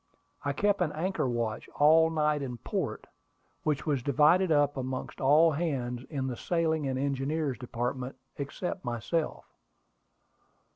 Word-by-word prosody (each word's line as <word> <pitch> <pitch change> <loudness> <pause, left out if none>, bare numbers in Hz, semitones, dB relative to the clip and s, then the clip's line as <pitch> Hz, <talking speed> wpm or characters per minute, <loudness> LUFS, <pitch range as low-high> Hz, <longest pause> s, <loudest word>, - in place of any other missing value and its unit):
I 145 - 0
kept 200 +7 +1
an 165 -4 +1
anchor 165 -4 -1
watch 115 -2 -2
all 160 +2 +6
night 150 -2 +1
in 125 -3 -4
port, - - -3 0.6
which 150 -3 -1
was 145 -5 +1
divided 155 +7 +4
up 145 -1 +3
amongst 130 -1 -4
all 155 +5 +6
hands 130 -6 -2
in 140 -4 -2
the 130 -2 -2
sailing 160 +1 0
and 130 -1 -1
engineer's 140 +1 -1
department, 125 +1 -3 0.2
except 175 +6 -4
myself. 120 +7 -2
145 Hz, 135 wpm, -29 LUFS, 130-160 Hz, 0.6 s, all